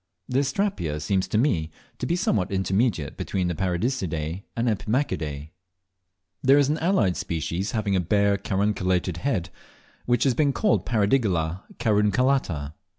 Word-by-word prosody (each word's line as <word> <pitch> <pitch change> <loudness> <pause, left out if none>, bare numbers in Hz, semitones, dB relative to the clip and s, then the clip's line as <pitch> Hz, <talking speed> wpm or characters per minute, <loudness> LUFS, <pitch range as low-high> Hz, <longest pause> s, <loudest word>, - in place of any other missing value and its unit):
The 125 - +1
Astrapia 135 - -1
seems 95 +5 0
to - - 0
me 90 - +1 0.3
to - - -2
be 170 - +1
somewhat 105 - 0
intermediate 95 - 0
between 90 -2 -1
the - - -1
Paradiseidae 90 - -2
and 115 +1 0
Epimachidae. 90 - -1 0.9
There 135 +2 +5
is 145 -1 +3
an 155 - 0
allied 160 - +2
species, 85 +5 -3
having 105 -3 0
a - - +3
bare 100 +3 +2
carunculated 95 -3 0
head, 90 -8 -1 0.6
which 120 -1 +3
has 135 - +3
been 140 +3 +2
called 210 +6 +1
Paradigalla 100 -7 +1 0.2
carunculata. 105 - +1
100 Hz, 140 wpm, -25 LUFS, 85-125 Hz, 0.9 s, There